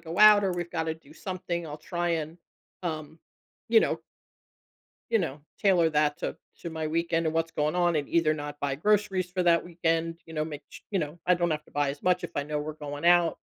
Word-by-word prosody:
go 165 +1 -6
out, 210 -1 +9
or 190 - +1
we've 175 -1 -4
gotta 160 -2 -1
do 155 -2 -18
something, 180 -2 -4
I'll 150 -1 -6
try 175 +2 -3
and, 160 +3 -8 0.4
um, 160 -2 -4 0.5
you 450 - +6
know - - +1 1.1
you 225 - +4
know, 155 -6 -3 0.2
tailor 180 -5 +4
that 150 -1 +2
to - - -3 0.3
to 170 - -5
my 160 -1 -3
weekend 165 +1 0
and 160 - 0
what's 165 0 0
going 150 +1 0
on 175 -2 +2
and 145 -2 -1
either 165 -2 +3
not 145 -1 -5
buy 140 -1 0
groceries 195 0 +1
for 180 0 0
that 170 -1 +4
weekend, 165 -1 -1
you 165 - -12
know, 155 -1 -1
make 150 -2 -7
ch - - -12
you 195 - +1
know, 150 +2 -4
I 180 - +6
don't 175 0 0
have 150 -1 -2
to - - -21
buy 145 -1 +1
as 140 +1 -8
much 180 0 +2
if 175 - -4
I 145 - +1
know 150 0 -2
we're 155 +1 -4
going 145 0 -6
out, 175 -1 +5
165 Hz, 230 wpm, -28 LUFS, 155-175 Hz, 1.1 s, out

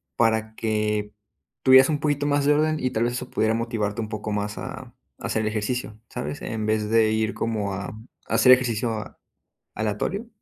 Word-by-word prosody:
para 110 -1 +1
que, 105 -2 -1 0.5
tuvieras 130 +1 +7
un 150 -2 0
poquito 145 -1 0
más 145 -1 +2
de 145 - +5
orden. 155 +1 +1
y 130 - -1
tal 115 -2 0
vez 120 - -1
eso 125 - -5
pudiera 110 0 +1
motivarte 115 -3 -2
un 110 - -5
poco 105 0 -4
más 105 0 -2
a - - -7 0.3
a - - -3
hacer 110 -1 0
ejercicio, 110 +1 -2
¿sabes?, 75 +1 -5
en 110 -1 -3
vez 110 -1 0
de 110 -1 +4
ir 110 0 0
como 105 -3 -2
a 95 +1 -4 0.4
a - - -4
hacer 130 - +6
ejercicio 120 -2 +1
a 110 -1 -6 0.6
¿aleatorio? 110 - -2
110 Hz, 190 wpm, -24 LUFS, 105-125 Hz, 0.6 s, tuvieras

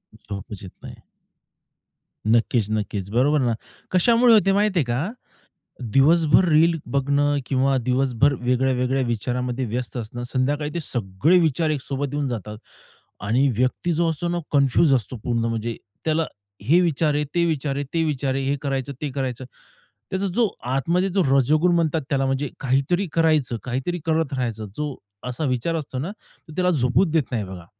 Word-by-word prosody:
झोपच 100 -1 -8
येत 95 - -9
नाही. - - -10 1.3
नक्कीच, 115 -1 +2
नक्कीच. 105 -2 -2
बरोबर 140 +6 +3
ना. 120 -2 +1 0.4
कशामुळे 230 +6 +5
होते 200 -3 +5
माहिती 205 -2 +2
आहे - - +3
का? 125 +9 -1 0.8
दिवसभर 160 +5 +5
रील 165 +1 +4
बघणं 145 +1 +1
किंवा 135 +1 +1
दिवसभर 130 +1 +2
वेगळ्या 125 +2 +1
वेगळ्या 125 +2 0
विचारामध्ये 125 +2 -2
व्यस्त 120 +2 -4
असणं 120 +1 -5
संध्याकाळी 145 +4 -1
ते 170 - -2
सगळे 120 - +1
विचार 160 -1 +1
एक 150 -3 -1
सोबत 140 +1 -3
येऊन 145 -1 -1
जातात 105 -3 -5 0.7
आणि 125 +7 +3
व्यक्ती 130 +7 0
जो 165 +1 +1
असतो 160 +2 -3
ना 175 - -1
कन्फ्युज 140 +1 +4
असतो 125 -1 -1
पूर्ण 115 -2 0
म्हणजे, 115 0 -2 0.3
त्याला 160 0 +1 0.4
हे 155 +11 +4
विचार 160 -3 +1
आहे, 150 - +1
ते 170 -1 +3
विचार 150 -4 -1
आहे, 140 - -2
ते 165 -1 +2
विचार 140 -3 -1
आहे 135 - -1
हे 140 +1 0
करायचं, 135 -1 -2
ते 150 - -2
करायचं. 130 -2 -3 0.7
त्याचा 190 +1 0
जो 235 -2 +3 0.3
आतमध्ये 175 +8 +1
जो 190 +1 +1 0.2
रजोगुण 155 +7 +3
म्हणतात 160 -2 +1
त्याला 135 -1 +1
म्हणजे 135 +1 -1
काहीतरी 140 +9 +1
करायचं, 155 -7 +2
काहीतरी 130 +8 -3
करत 160 -3 0
राहायचं 115 -4 -3
जो 150 -2 -3 0.3
असा 125 +5 -3
विचार 130 +5 -1
असतो 140 -5 -4
ना 160 +9 -3
तो 160 -6 -18
त्याला 180 +1 +2
झोपूच 145 +4 +2
देत 160 -2 +3
नाही 115 -4 -1
बघा. 95 -3 -9
140 Hz, 165 wpm, -23 LUFS, 125-160 Hz, 1.3 s, कशामुळे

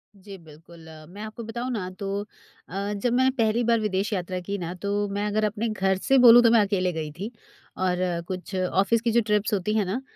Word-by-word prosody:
जी, 195 0 -11
बिल्कुल 160 0 -16
अ, 155 -1 -12
मैं 200 +4 -10
आपको 220 +2 -7
बताऊँ 235 +3 -4
ना 185 -6 -3
तो 200 0 -2 0.5
अ, 200 +3 -3
जब 220 +4 -1
मैंने 260 +1 +4
पहली 225 +1 +2
बार 230 -1 +2
विदेश 205 0 -1
यात्रा 185 -1 -3
की 200 +3 -4
ना 175 -2 -5
तो 205 0 -1
मैं 205 +1 -2
अगर 215 +1 0
अपने 210 +2 -2
घर 190 -2 0
से 270 - +5
बोलूँ 240 -1 +8
तो 230 - +5
मैं 230 -2 +6
अकेले 195 -3 0
गई 155 -2 -4
थी। 210 +4 -4 0.5
और 185 -1 0 0.3
कुछ 185 +1 -6
ऑफिस 195 +5 +1
की 230 -1 0
जो 235 - +3
ट्रिप्स 210 +1 +1
होती 205 +1 0
हैं 210 - +1
ना 210 +8 -3
205 Hz, 225 wpm, -25 LUFS, 185-225 Hz, 0.5 s, बोलूँ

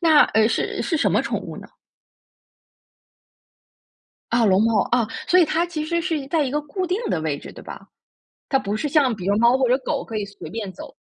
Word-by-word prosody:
那， 320 -4 +6
呃， 220 0 +4
是 - - -2
是 330 - -1
什 - - +1
么 - - +3
宠 - - -2
物 - - -8
呢？ - - -11 2.6
啊， 235 0 +3
龙 195 -1 +4
猫， 225 -2 +3
啊。 240 -2 +2 0.2
所 365 - +5
以 355 - +7
它 330 +2 0
其 315 -3 -4
实 340 +2 -1
是 330 -2 -1
一 275 - -7
在 315 -1 +1
一 260 - -2
个 295 +2 0
固 365 +6 -4
定 365 +3 -1
的 160 - -1
位 150 -3 -2
置， - - -11
对 - - -12
吧？ - - -10 0.6
它 270 - +2
不 210 -5 -3
是 295 - -2
像 280 -5 +3
比 190 -4 -7
如 200 +1 +2
猫 235 +4 +4
或 260 -2 +2
者 250 - +4
狗 260 - -3
可 225 - -6
以 210 - -1
随 200 -5 -10
便 205 -1 -5
走。 - - -11
255 Hz, 245 characters per minute, -22 LUFS, 215-315 Hz, 2.6 s, 以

